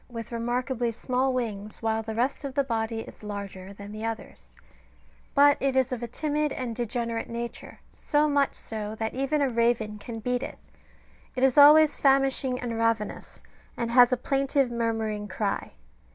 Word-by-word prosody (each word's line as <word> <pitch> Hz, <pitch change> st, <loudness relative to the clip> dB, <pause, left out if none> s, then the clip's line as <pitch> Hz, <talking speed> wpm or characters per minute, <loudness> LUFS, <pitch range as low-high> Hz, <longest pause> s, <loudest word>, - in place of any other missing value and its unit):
483 245 Hz, -, -21 dB
witli 230 Hz, 0 st, -5 dB
remarkably 245 Hz, 0 st, -1 dB
small 255 Hz, +3 st, 0 dB
wings, 215 Hz, -4 st, -3 dB
while 220 Hz, 0 st, +1 dB
the 220 Hz, 0 st, -6 dB
rest 250 Hz, +6 st, 0 dB
of 275 Hz, -2 st, -5 dB
the 280 Hz, -, +3 dB
body 225 Hz, -3 st, -2 dB
is -, -, -12 dB
larger 200 Hz, -2 st, -7 dB
than 200 Hz, +1 st, -10 dB
the 215 Hz, +1 st, -7 dB
others; 220 Hz, -, -6 dB, 0.8 s
but 285 Hz, 0 st, +6 dB
it 270 Hz, -1 st, 0 dB
is 260 Hz, 0 st, +2 dB
of 250 Hz, -2 st, -3 dB
a 240 Hz, -, -3 dB
timid 300 Hz, +4 st, -1 dB
and 240 Hz, -3 st, -4 dB
degenerate 235 Hz, -1 st, -3 dB
nature, 235 Hz, 0 st, -6 dB
so 300 Hz, 0 st, +1 dB
much 285 Hz, -1 st, +1 dB
so, 215 Hz, -1 st, -6 dB
that 220 Hz, 0 st, -3 dB
even 275 Hz, +3 st, 0 dB
a 275 Hz, -, +2 dB
raven 230 Hz, -2 st, +1 dB
can 225 Hz, +2 st, -7 dB
beat 250 Hz, +2 st, -1 dB
it. 275 Hz, -, -6 dB, 0.8 s
It 255 Hz, -, -1 dB
is 265 Hz, -2 st, +4 dB
always 300 Hz, +1 st, +8 dB
famishing 270 Hz, -2 st, +2 dB
and 230 Hz, -2 st, -3 dB
ravenous, 230 Hz, -2 st, -1 dB, 0.4 s
and 235 Hz, 0 st, -2 dB
has 245 Hz, 0 st, +7 dB
a 255 Hz, -, +2 dB
plaintive 275 Hz, 0 st, +1 dB
murmuring 225 Hz, -3 st, -2 dB
cry. 200 Hz, +1 st, -3 dB
235 Hz, 175 wpm, -27 LUFS, 225-265 Hz, 0.8 s, always